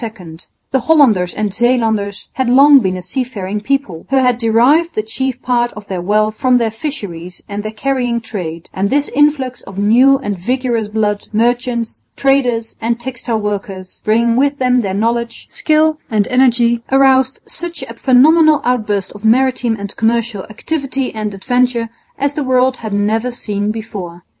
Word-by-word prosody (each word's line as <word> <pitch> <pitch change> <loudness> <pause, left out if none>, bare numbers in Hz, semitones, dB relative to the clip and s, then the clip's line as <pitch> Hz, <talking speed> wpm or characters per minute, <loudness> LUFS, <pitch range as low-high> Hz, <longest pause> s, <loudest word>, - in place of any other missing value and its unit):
The 265 - +2
Hollanders 240 - +3
and 210 -1 -1
Zeelanders 220 -4 0
had 260 -2 -1
long 275 +3 +7
been 190 -5 -1
a 180 - -8
seafaring 210 -2 -4
people, 215 -9 -2
who 270 - +1
had 250 -2 +2
derived 250 +9 +3
the 215 - 0
chief 260 +3 -3
part 240 -1 +1
of 210 -1 -10
their 190 -3 -4
wealth 215 +3 +1
from 255 -2 +3
their 230 -2 0
fisheries 200 - -7
and 205 0 -4
their 215 +1 -5
carrying 245 0 -1
trade; 180 -7 -6
and 195 +1 -1
this 285 +3 +1
influx 280 -3 +1
of 195 - -12
new 245 +7 +4
and 205 -8 -4
vigorous 240 +1 -1
blood, 210 -1 -2
merchants, 235 +1 -1
traders, 250 -5 +1
and 230 +1 -1
textile 240 -2 -3
workers, 195 -3 -5
bringing 230 +2 +2
with 280 +2 +1
them 250 -1 +2
their 195 -3 -3
knowledge, 230 +2 -2
skill 310 0 +2
and 210 -3 +1
energy, 240 -2 +3
aroused 265 -1 +3
such 345 -4 -7
a 230 - -8
phenomenal 300 +6 +4
outburst 210 -6 -1
of 205 - -13
maritime 240 0 +2
and 200 0 -7
commercial 230 -3 0
activity 270 +3 -3
and 215 -2 -4
adventure 245 +2 0 0.3
as 280 +1 -1
the 295 - -2
world 255 0 +2
had 220 -2 -6
never 215 +4 0
seen 210 -4 -3
before. 195 -6 -6
235 Hz, 160 wpm, -16 LUFS, 210-260 Hz, 0.3 s, long